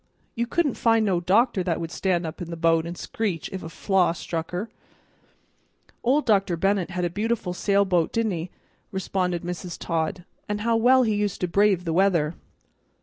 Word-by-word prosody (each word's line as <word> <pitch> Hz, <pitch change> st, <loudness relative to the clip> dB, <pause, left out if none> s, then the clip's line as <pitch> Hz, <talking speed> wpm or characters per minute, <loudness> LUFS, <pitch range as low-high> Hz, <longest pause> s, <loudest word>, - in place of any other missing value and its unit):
You 235 Hz, +1 st, -2 dB
couldn't 310 Hz, 0 st, +1 dB
find 225 Hz, -1 st, +3 dB
no 185 Hz, -4 st, +2 dB
doctor 195 Hz, +4 st, +2 dB
that 175 Hz, -2 st, -1 dB
would 165 Hz, -1 st, -5 dB
stand 175 Hz, +1 st, 0 dB
up 160 Hz, +2 st, -6 dB
in 170 Hz, -, -5 dB
the 170 Hz, -, -5 dB
boat 165 Hz, 0 st, +2 dB
and 175 Hz, +1 st, -6 dB
screech 195 Hz, -6 st, -3 dB
if 190 Hz, -, -4 dB
a 160 Hz, -, -7 dB
flaw 185 Hz, -1 st, +1 dB
struck 165 Hz, -1 st, -4 dB
her." 180 Hz, +5 st, -3 dB, 1.3 s
"Old 275 Hz, +5 st, +2 dB
Dr. 195 Hz, -5 st, +2 dB
Bennett 195 Hz, 0 st, +1 dB
had 180 Hz, -1 st, -2 dB
a -, -, 0 dB
beautiful 210 Hz, -1 st, -1 dB
sailboat, 190 Hz, -3 st, +2 dB
didn't 225 Hz, -2 st, 0 dB
he?" 170 Hz, 0 st, -4 dB, 0.4 s
responded 185 Hz, -2 st, -1 dB
Mrs. 175 Hz, 0 st, -5 dB
Todd. 165 Hz, +1 st, -2 dB, 0.2 s
"And 210 Hz, 0 st, -2 dB
how 230 Hz, +1 st, +2 dB
well 255 Hz, +3 st, +5 dB
he 220 Hz, -3 st, +1 dB
used 205 Hz, -2 st, -1 dB
to 180 Hz, -, +1 dB
brave 195 Hz, 0 st, +3 dB
the 165 Hz, -, -1 dB
weather! 170 Hz, -4 st, +2 dB
185 Hz, 185 wpm, -25 LUFS, 170-210 Hz, 1.3 s, well